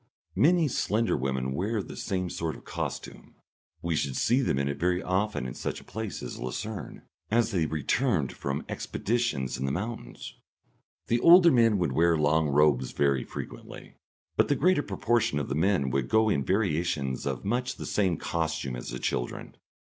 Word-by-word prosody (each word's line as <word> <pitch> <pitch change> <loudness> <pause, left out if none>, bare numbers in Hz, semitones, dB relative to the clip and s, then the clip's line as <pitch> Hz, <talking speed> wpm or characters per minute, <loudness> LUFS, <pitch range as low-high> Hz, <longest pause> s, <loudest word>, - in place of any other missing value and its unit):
Many 170 +1 +4
slender 115 -3 0
women 65 -1 -1
wear 100 +6 -1
the - - -9
same 90 -2 -2
sort 80 -2 -3
of - - -14
costume. - - -6 0.5
We 85 -1 0
should 70 -3 -1
see 125 +4 +3
them 120 - 0
in 70 0 0
it 70 0 -3
very 90 +2 +1
often 95 - -1
in 60 - -4
such - - -4
a - - -15
place 110 -2 -6
as - - -6
Lucerne, 100 - -5 0.3
as 115 +1 +2
they 85 -6 +1
returned 80 - 0
from 70 0 -4
expeditions 100 - -2
in 65 - -1
the - - 0
mountains. 95 - -5 0.7
The 120 - +1
older 170 +4 +8
men 115 -5 +4
would 85 -7 0
wear 85 +4 +3
long 75 +1 +2
robes 70 -3 +3
very 70 -3 +2
frequently, - - -9 0.4
but - - +3
the 145 - +2
greater 165 +4 +3
proportion 120 - 0
of 70 - -2
the - - -1
men 80 -4 +1
would 65 0 -1
go 110 0 +4
in 70 -9 +1
variations 80 -7 0
of - - -3
much 125 +5 -1
the - - -7
same 95 -5 +1
costume 80 -7 -2
as - - -6
the 60 - -4
children. - - -3
85 Hz, 175 wpm, -28 LUFS, 70-110 Hz, 0.7 s, older